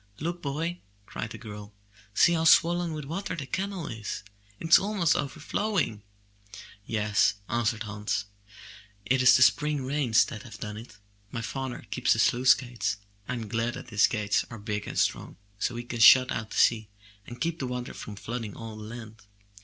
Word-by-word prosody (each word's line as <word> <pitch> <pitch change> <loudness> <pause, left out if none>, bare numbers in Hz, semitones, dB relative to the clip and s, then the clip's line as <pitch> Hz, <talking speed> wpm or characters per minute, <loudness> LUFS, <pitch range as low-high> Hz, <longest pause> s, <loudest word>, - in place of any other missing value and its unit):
''Look, 170 +3 -4
boy! 160 +5 -3 0.3
cried 110 - -5
the 115 - -8
girl. 105 -2 -10 0.4
''See 175 - +5
how 165 -1 0
swollen 170 +1 +4
with 150 -2 -5
water 180 +8 -4
the 150 -4 -5
canal 190 +4 -3
is! 110 -4 -5 0.4
It 165 - -5
is 165 - +9
almost 195 -5 +1
overflowing. 155 - -1 0.9
"Yes, 105 -2 +2
answered 115 -1 0
Hans, 105 0 -3 0.8
"it 130 +4 +2
is 125 -1 +7
the 130 - +6
spring 150 0 +2
rains 130 -5 +3
that 110 - -8
have 105 -3 -11
done 105 +1 -6
it. 110 -3 -11 0.3
My 115 0 -5
father 130 +2 -5
keeps 125 0 +2
the - - -3
sluice 125 +3 +5
gates. 120 -5 -3 0.3
Fm 120 -4 -3
glad 115 +2 -1 0.2
his 105 -2 +5
gates 105 -2 0
are 115 - -8
big 105 -1 -4
and - - -6
strong, - - 0 0.2
so 120 - -1
he 120 - -4
can 120 -1 -6
shut 130 +3 +8
out 110 -1 -3
the - - -6
sea, 110 -2 +3 0.4
and 120 - -9
keep 170 0 -2
the 130 - -2
water 125 0 -4
from 105 - -8
flooding 115 0 -5
all 115 -1 -7
the 110 - -8
land. 110 0 -9
120 Hz, 180 wpm, -28 LUFS, 110-150 Hz, 0.9 s, is